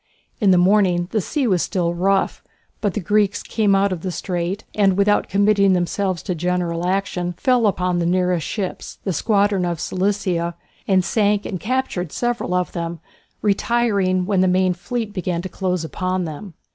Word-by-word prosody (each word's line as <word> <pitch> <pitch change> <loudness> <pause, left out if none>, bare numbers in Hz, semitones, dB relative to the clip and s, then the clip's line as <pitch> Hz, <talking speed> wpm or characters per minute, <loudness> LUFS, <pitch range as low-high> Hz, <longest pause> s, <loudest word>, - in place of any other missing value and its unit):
In 205 -5 +3
the 185 - +6
morning 180 -2 +3
the 215 - +1
sea 290 - -1
was 185 -7 +2
still 175 -3 -1
rough, 190 +3 0 0.4
but 205 -4 -1
the - - 0
Greeks 205 +2 +1
came 210 -3 +1
out 195 0 +2
of 180 -3 -3
the 185 - -3
strait, 180 +3 -3
and, 195 -3 +2
without 205 +1 +2
committing 200 0 +3
themselves 185 0 -1
to 195 - -3
a - - +2
general 175 0 -1
action, 180 -2 -1
fell 240 +5 +2
upon 180 -3 0
the 170 - 0
nearest 180 -2 +1
ships, 195 -4 -5
the 190 - -1
squadron 200 +1 +2
of 170 -2 -2
Cilicia, 185 -3 -1 0.3
and 185 -2 +3
sank 205 +1 +1
and 185 - -4
captured 215 - -2
several 240 -5 -1
of 180 -1 0
them, 170 -1 -4 0.4
retiring 200 -3 +1
when 195 -1 +2
the 185 - +3
main 185 0 +2
fleet 210 +4 -4
began 180 -2 -2
to 190 - -5
close 180 -3 -2
upon 185 +2 -2
them. 165 +3 -8
185 Hz, 180 wpm, -21 LUFS, 180-205 Hz, 0.4 s, the